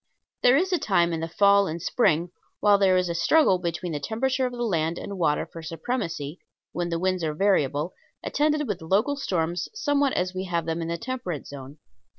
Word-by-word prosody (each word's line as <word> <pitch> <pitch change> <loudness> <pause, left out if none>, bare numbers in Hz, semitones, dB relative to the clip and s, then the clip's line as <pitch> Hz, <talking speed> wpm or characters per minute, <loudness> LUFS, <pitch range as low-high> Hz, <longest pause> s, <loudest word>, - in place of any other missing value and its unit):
There 250 +2 +6
is 370 +4 +1
a 355 - +2
time 170 -4 +2
in 165 - -2
the 165 - -3
fall 200 +2 +4
and 165 0 -4
spring, 175 -4 +1 0.3
while 205 -1 +4
there 190 -2 +4
is 180 0 +1
a 170 - -2
struggle 185 - +3
between 175 0 -3
the 150 - -3
temperature 255 - 0
of - - -6
the 240 -1 -4
land 165 -6 0
and 200 - -6
water 150 -3 +1
for 165 - -10
supremacy, 165 - -4 0.3
when 175 0 -2
the 170 - -1
winds 185 0 0
are 155 -1 -1
variable, 155 -4 +1 0.3
attended 300 -1 +1
with 200 -5 -3
local 205 - +1
storms 175 - -2
somewhat 290 - +1
as 180 +1 -1
we 185 +1 -4
have 170 -3 -1
them 165 0 -2
in 165 - -3
the 170 0 -2
temperate 230 - -5
zone. 140 +1 -10
180 Hz, 205 wpm, -25 LUFS, 165-230 Hz, 0.3 s, There